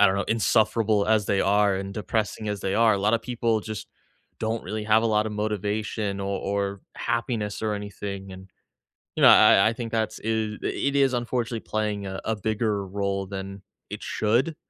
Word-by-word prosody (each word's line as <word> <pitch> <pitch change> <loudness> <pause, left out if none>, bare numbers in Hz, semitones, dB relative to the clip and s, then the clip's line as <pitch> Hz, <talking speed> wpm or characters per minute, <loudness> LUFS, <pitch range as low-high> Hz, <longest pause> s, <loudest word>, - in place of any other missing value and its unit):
I 105 - +8
don't 95 - +2
know, 100 - +1
insufferable 110 -1 +2
as 110 -2 +2
they 100 - +1
are 100 0 +3
and 95 +1 -4
depressing 105 +1 -2
as 105 -1 -3
they 95 +1 -1
are, 115 0 +5
a 100 - -1
lotta 105 +4 +2
people 115 -1 0
just 110 0 -7 0.5
don't 110 +1 -1
really 110 0 -4
have 110 +1 +4
a - - +2
lotta 110 0 +1
motivation 105 -1 -2
o 100 - -3
or 100 0 -2 0.2
happiness 115 -3 -2
or 110 -1 -1
anything, 100 -1 -6
and, 95 +1 -11 0.7
you - - 0
know, - - +9
I - - +8
I 95 - +5
I 115 - 0
think 115 -1 -6
that's 110 -1 -1
i - - -5 0.4
it 140 0 -1
is 135 -2 +4
unfortunately 120 -1 -2
playing 105 -2 -2
a 95 0 -5
a 110 -1 -1
bigger 105 -1 -1
role 100 0 -2
than 95 0 -7 0.3
it - - -6
should. 120 +9 0
105 Hz, 190 wpm, -25 LUFS, 100-110 Hz, 0.7 s, know